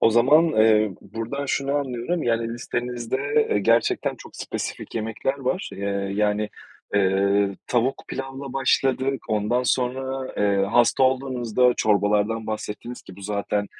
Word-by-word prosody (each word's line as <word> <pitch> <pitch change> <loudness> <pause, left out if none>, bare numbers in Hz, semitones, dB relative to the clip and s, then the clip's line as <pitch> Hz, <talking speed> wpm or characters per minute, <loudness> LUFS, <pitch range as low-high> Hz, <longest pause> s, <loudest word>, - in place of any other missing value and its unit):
O 115 - +5
zaman, 145 +9 +5
eee, 110 -6 +4
buradan 115 +7 -5
şunu 140 +1 -1
anlıyorum, 140 +4 -1
yani, 115 0 0
listenizde, 125 +5 -1
eee, - - +3
gerçekten 115 +3 +2
çok - - -13
spesifik - - -5
yemekler 115 +5 -2
var, 140 +9 -2
eee, 100 0 -2
yani, 105 0 +1 0.5
eee, 100 0 +2
tavuk 125 +2 0
pilavla 135 0 -6
başladık, 135 0 +1
ondan 110 +4 +1
sonra, 130 +1 -1
eee, 100 -1 +2
hasta 120 +3 +4
olduğunuzda 125 -2 +2
çorbalardan 105 +1 +1
bahsettiniz 110 +2 -5
ki - - -13
bu 100 - -12
zaten 100 0 -1
120 Hz, 130 wpm, -24 LUFS, 105-130 Hz, 0.5 s, O